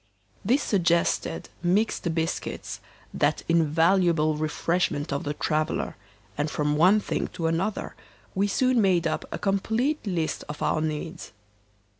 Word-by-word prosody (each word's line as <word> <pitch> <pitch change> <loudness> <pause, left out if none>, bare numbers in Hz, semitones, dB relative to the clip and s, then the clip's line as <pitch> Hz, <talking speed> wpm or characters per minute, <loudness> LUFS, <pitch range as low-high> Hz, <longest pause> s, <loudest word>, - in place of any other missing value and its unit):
This 255 +8 +2
suggested 170 -4 +1
mixed 180 -2 +1
biscuits, 165 0 -3 0.3
that - - +1
invaluable 165 0 +3
refreshment 155 -1 -1
of 140 - -3
the 145 0 -2
traveller, 155 0 -1 0.4
and 145 +1 -1
from 150 0 0
one 185 +7 +5
thing - - -2
to 165 - -3
another 170 +6 -1 0.4
we 195 +2 +1
soon 255 +3 +2
made 180 -4 +3
up 160 - -1
a - - -3
complete 220 +9 0
list 170 -5 -1
of 150 - -5
our 155 - +1
needs. 155 - -4
170 Hz, 130 wpm, -26 LUFS, 155-195 Hz, 0.4 s, one